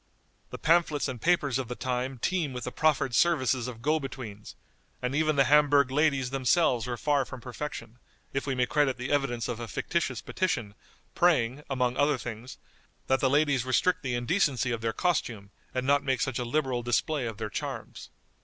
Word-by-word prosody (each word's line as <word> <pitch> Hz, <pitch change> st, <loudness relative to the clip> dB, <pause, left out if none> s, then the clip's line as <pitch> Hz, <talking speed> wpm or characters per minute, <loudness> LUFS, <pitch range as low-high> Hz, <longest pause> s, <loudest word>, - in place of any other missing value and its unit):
The -, -, -7 dB
pamphlets 160 Hz, -3 st, +2 dB
and 125 Hz, -3 st, -6 dB
papers 145 Hz, -7 st, +2 dB
of 130 Hz, -, -3 dB
the 125 Hz, -, -5 dB
time 130 Hz, +1 st, -2 dB
teem 160 Hz, +1 st, -1 dB
with 125 Hz, -, -5 dB
the -, -, -4 dB
proffered 150 Hz, -4 st, +1 dB
services 130 Hz, -5 st, +2 dB
of 115 Hz, -2 st, -8 dB
go 155 Hz, +2 st, +2 dB
betweens, 120 Hz, -7 st, -8 dB, 0.4 s
and 125 Hz, +1 st, -2 dB
even 155 Hz, +1 st, +2 dB
the 140 Hz, -, +5 dB
Hamburg 145 Hz, -1 st, +4 dB
ladies 135 Hz, -3 st, +1 dB
themselves 130 Hz, -2 st, +2 dB
were 120 Hz, -1 st, -3 dB
far 145 Hz, 0 st, +1 dB
from 130 Hz, 0 st, -9 dB
perfection, 120 Hz, -2 st, -7 dB, 0.3 s
if 135 Hz, +1 st, -2 dB
we 135 Hz, -, 0 dB
may 125 Hz, 0 st, +2 dB
credit 140 Hz, 0 st, +1 dB
the 125 Hz, +1 st, -4 dB
evidence 130 Hz, -5 st, 0 dB
of 120 Hz, -2 st, -4 dB
a 120 Hz, -, -5 dB
fictitious 135 Hz, -2 st, -2 dB
petition, 120 Hz, -, -2 dB, 0.4 s
praying, 145 Hz, -6 st, +2 dB
among 125 Hz, -2 st, 0 dB
other 145 Hz, 0 st, +3 dB
things, 120 Hz, +1 st, -7 dB, 0.5 s
that 130 Hz, 0 st, +2 dB
the 130 Hz, -, +2 dB
ladies 145 Hz, -2 st, +2 dB
restrict 145 Hz, +8 st, +1 dB
the 130 Hz, -3 st, -2 dB
indecency 130 Hz, -, +1 dB
of 115 Hz, -1 st, -2 dB
their 115 Hz, 0 st, 0 dB
costume, 115 Hz, -, -1 dB, 0.2 s
and 130 Hz, 0 st, -2 dB
not 140 Hz, +1 st, +3 dB
make 130 Hz, -2 st, 0 dB
such 135 Hz, -2 st, -1 dB
a 125 Hz, -, -2 dB
liberal 130 Hz, -1 st, 0 dB
display 120 Hz, +3 st, 0 dB
of 110 Hz, -2 st, -6 dB
their 110 Hz, -2 st, -5 dB
charms. -, -, -6 dB
130 Hz, 190 wpm, -28 LUFS, 120-145 Hz, 0.5 s, the